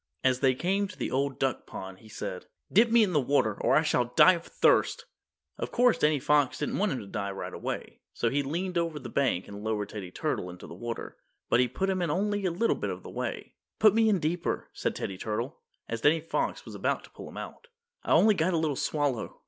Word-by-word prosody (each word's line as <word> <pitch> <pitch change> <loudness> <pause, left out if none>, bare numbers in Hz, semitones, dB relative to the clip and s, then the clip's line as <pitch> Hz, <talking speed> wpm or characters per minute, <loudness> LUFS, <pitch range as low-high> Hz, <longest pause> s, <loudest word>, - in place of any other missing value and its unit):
As 130 -1 +3
they 130 -1 +3
came 195 +7 0
to 185 - -12
the - - -3
Old 135 +1 0
Duck 135 -3 -1
Pond 95 0 -8
he 110 - -16
said, 90 -3 -6 0.3
"Dip 230 +4 +6
me 230 0 +6
in 190 -4 0
the 150 - +4
water, 125 -6 +1
or - - +3
I 155 - +5
shall 125 -5 +2
die 125 +9 +6
of 170 -2 -4
thirst!" 470 - +2 0.5
Of - - -3
course 245 -1 +3
Danny 150 -1 +3
Fox 145 0 +2
didn't 150 - -2
want 210 0 +2
him 125 - -2
to - - -9
die 100 0 -3
right 95 - -6
away, - - -5
so 115 - -1
he 145 - +1
leaned 170 +6 -2
over 165 -2 -2
the 150 - -7
bank 130 -10 0
and 100 0 -8
lowered 105 -2 -2
Teddy 100 -4 -6
Turtle 90 0 -2
into 90 0 -10
the - - -9
water. 115 +6 -6 0.3
But 115 - +5
he 125 - +4
put 190 +11 -2
him 185 -1 -1
in 175 - 0
only 205 +4 0
a - - 0
little 195 +8 +1
bit - - -3
of - - -6
a - - -8
way. - - -4 0.2
"Put 215 -2 +6
me 225 0 +4
in 205 - +3
deeper," 170 +1 -2
said - - -2
Teddy 95 -2 -4
Turtle, 115 +7 -3 0.3
as 115 0 -4
Danny 155 +5 +4
Fox 165 - -2
was - - -9
about - - -1
to - - -15
pull - - -10
him - - -11
out, 475 - -8 0.4
"I - - -3
only 215 0 +6
got 175 -1 +1
a - - +2
little 155 -3 0
swallow." 145 -4 -1
145 Hz, 245 wpm, -29 LUFS, 115-185 Hz, 0.5 s, Dip